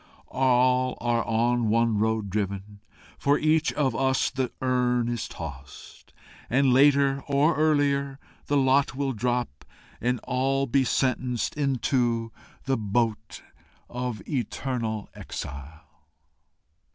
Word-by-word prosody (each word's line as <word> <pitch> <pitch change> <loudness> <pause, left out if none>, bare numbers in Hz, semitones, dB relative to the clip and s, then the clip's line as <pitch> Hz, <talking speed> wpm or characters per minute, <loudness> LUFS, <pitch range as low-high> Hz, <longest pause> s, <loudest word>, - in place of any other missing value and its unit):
All 130 0 +2
are 120 -1 0
on 115 0 +1
one 115 -1 +2
road 110 -2 0
driven; 100 0 -3 0.4
for 140 +1 +3
each 155 0 +2
of 140 -3 0
us 130 -1 +1
The 130 -1 -2
urn 125 -2 +1
is 120 -2 -3
tossed, 70 -5 -10 0.4
and, 135 +1 +3
later 140 0 +4
or 145 +3 +2
earlier, 140 -2 +1 0.3
The 145 - +2
lot 135 0 +2
will 135 -1 -1
drop 120 - -2 0.4
and 125 +1 0
all 135 +2 0
be 135 +1 +2
sentenced 125 -1 0
Into 125 -5 0 0.3
the 135 0 0
boat 110 +1 -2 0.5
of 125 -4 -4
eternal 120 -4 -3
exile." 70 +4 -8
125 Hz, 115 wpm, -26 LUFS, 115-135 Hz, 0.5 s, later